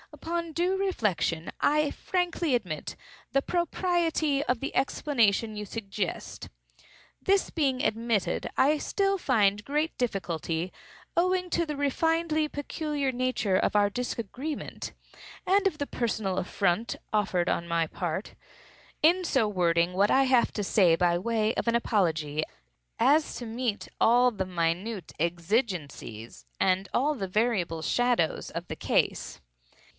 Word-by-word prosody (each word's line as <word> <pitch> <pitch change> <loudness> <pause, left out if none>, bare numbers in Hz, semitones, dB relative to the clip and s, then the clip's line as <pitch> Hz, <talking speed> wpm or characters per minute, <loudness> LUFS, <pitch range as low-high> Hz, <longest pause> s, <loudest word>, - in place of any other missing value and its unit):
Upon 335 +3 -3
due 360 +4 +1
reflection 210 - 0
I 300 0 +3
frankly 350 -4 -1
admit 180 -11 -2 0.4
the 275 - +4
propriety 335 -4 0
of 250 -5 0
the 275 - -5
explanation 230 -6 +1
you 210 - -4
suggest. 200 -3 -5 0.7
This 395 0 +2
being 275 -4 0
admitted, 225 -4 0
I 295 +3 +4
still 395 +3 0
find 205 - +2
great 300 +5 -1
difficulty, 180 -6 -2 0.4
(owing 365 +1 +1
to 335 - +1
the 300 - -3
refinedly 310 +2 +1
peculiar 290 -1 -2
nature 250 -6 0
of 185 - +1
our 205 -1 +4
disagreement, 250 +6 -4 0.5
and 395 +2 +3
of 360 - -2
the 285 - -3
personal 215 -5 -2
affront 195 +3 0 0.2
offered 185 -4 +1
on 170 - -1
my 170 -1 +1
part,) 175 +4 -4 0.7
in 350 +4 +5
so 265 -9 +2
wording 175 -3 +2
what 200 +3 +3
I 270 - +5
have 255 -2 +3
to 210 - -2
say 185 -4 +4
by 175 0 +2
way 220 +3 0
of - - -2
apology, 165 -10 +1 0.6
as 290 +6 +3
to 245 - -6
meet 230 -1 -2
all 245 +2 +5
the 195 -4 -3
minute 180 +3 -2
exigencies, 170 - -2
and 190 0 +2
all 290 +5 +2
the 200 -9 -4
variable 185 -6 0
shadows, 245 -9 +1
of - - -6
the - - -5
case. - - 0
230 Hz, 130 wpm, -28 LUFS, 185-295 Hz, 0.7 s, in